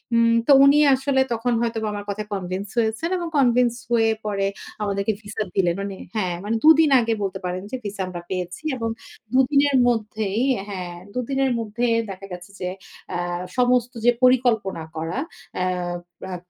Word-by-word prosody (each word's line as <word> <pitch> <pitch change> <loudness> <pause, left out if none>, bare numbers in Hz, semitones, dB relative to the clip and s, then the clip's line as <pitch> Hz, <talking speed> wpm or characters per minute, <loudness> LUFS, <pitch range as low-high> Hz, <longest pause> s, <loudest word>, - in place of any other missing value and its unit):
উম 230 0 +4
তো - - +6
উনি 285 +2 +6 0.2
আসলে 265 0 +1
তখন 235 +1 0
হয়তো 230 -1 -1 0.2
আমার 205 0 -5
কথা 210 +1 -3
কনভিন্স 190 +1 -3
হয়েছেন 225 +8 0
এবং 345 - -3
কনভিন্স 245 -2 +4 0.2
হয়ে 225 -1 +4
পরে 200 -2 0 0.4
আমাদেরকে 200 +1 0
ভিসা 210 0 -4
দিলেন। 175 -3 +2
মানে 200 -1 -4 0.2
হ্যাঁ, 185 -5 0
মানে 215 +2 -1
২ 310 - +8
দিন 315 - +5
আগে 230 -1 +1
বলতে 190 -1 -3
পারেন 180 +1 -2
যে 260 - -2
ভিসা 200 -1 -4
আমরা 175 -1 -6
পেয়েছি 180 - -4
এবং 230 -2 -2 0.4
২ 260 - +5
দিনের 280 -1 +4
মধ্যেই 215 -2 -1 0.3
হ্যাঁ, 180 -3 -5 0.2
২ 250 - -2
দিনের 270 -1 +1
মধ্যেই 230 +2 0 0.2
দেখা 195 0 -7
গেছে 180 +1 -9
যে, 180 - -2 0.4
অ্যা - - -2 0.4
সমস্ত 250 -1 +2
যে 245 - +7
পরিকল্পনা 235 -9 +3
করা। 165 +9 -3 0.4
অ্যা 180 0 0 0.6
অ্যা 185 - -4
220 Hz, 170 wpm, -23 LUFS, 190-245 Hz, 0.6 s, ২